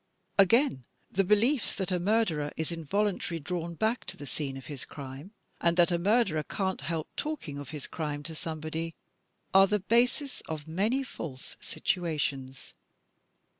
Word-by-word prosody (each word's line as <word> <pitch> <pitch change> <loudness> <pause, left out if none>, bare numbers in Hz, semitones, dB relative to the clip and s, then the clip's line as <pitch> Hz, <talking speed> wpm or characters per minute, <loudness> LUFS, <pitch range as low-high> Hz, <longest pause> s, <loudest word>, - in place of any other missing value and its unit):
Again 195 - +5 0.3
the 195 - +3
beliefs 220 +7 +3
that 190 -1 -1
"a 180 - +2
murderer 175 -7 +2
is 160 +1 -1
involimtarily 170 0 -1
drawn 170 0 -3
back 220 +7 +1
to - - -5
the 145 - -7
scene 135 -1 -3
of 135 - -9
his 140 -3 -6
crime," 140 +5 -8 0.3
and 170 0 +3
that 175 +1 +6
"a 170 - +2
murderer 195 -4 +3
can't 190 +3 -2
help 160 +2 -2
talking 260 - -3
of 140 -2 -7
his 150 -2 -5
crime 150 -3 -3
to 165 +2 -6
somebody," 160 +1 -4 0.6
are 195 0 +8
the 210 - +3
basis 245 +7 +2
of 155 -1 -4
many 210 +11 +1
false 140 - -7
situations. 140 -7 -2
170 Hz, 155 wpm, -30 LUFS, 150-205 Hz, 0.6 s, are